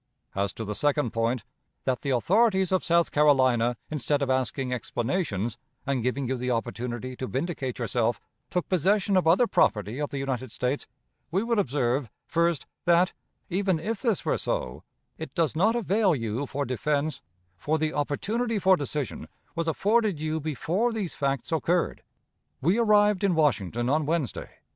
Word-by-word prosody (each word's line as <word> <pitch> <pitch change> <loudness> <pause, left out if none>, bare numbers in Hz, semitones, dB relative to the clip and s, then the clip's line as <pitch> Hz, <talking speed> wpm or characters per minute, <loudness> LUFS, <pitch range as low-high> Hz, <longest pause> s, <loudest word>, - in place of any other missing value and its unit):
As 100 0 0
to 110 - -5
the 105 - -3
second 145 0 +1
point, 115 +1 0 0.4
that 130 -2 -1
the 140 - -3
authorities 190 - +3
of 185 - +2
South 170 0 +3
Carolina, 130 -5 +3
instead 145 -1 0
of 135 - 0
asking 130 0 0
explanations, 120 - -2 0.3
and 135 -2 0
giving 125 +2 -1
you 130 +1 -1
the 125 +1 -2
opportunity 120 +1 -3
to 130 - -4
vindicate 135 -2 -3
yourself, 120 0 0 0.3
took 180 -2 -1
possession 195 +2 +2
of 185 -3 +3
other 180 +9 +5
property 110 - +1
of 145 - -1
the 140 - -5
United 130 -3 -3
States, 125 +5 -2 0.4
we 190 +6 0
would 230 -2 +1
observe, 130 - 0 0.2
first, 170 -2 +1 0.2
that, 175 +2 +4 0.3
even 190 -1 +1
if 215 +5 -3
this 230 -6 0
were - - +1
so, - - -2 0.4
it - - -7
does 165 -5 +1
not 210 +8 +3
avail 205 -5 +2
you 115 +2 -3
for 140 +2 -2
defense, 140 +3 -1 0.3
for 155 - -1
the 155 0 -1
opportunity 215 +11 -1
for 190 -1 +5
decision 145 - -4 0.3
was 165 0 -2
afforded 205 +1 +2
you 155 +1 -1
before 165 - 0
these 210 -6 -3
facts 140 +1 -2
occurred. 165 +2 0 0.6
We 175 - +2
arrived 210 -3 +4
in 190 -3 +3
Washington 120 - +1
on 150 +2 +1
Wednesday. 155 - -2
150 Hz, 160 wpm, -27 LUFS, 125-185 Hz, 0.6 s, other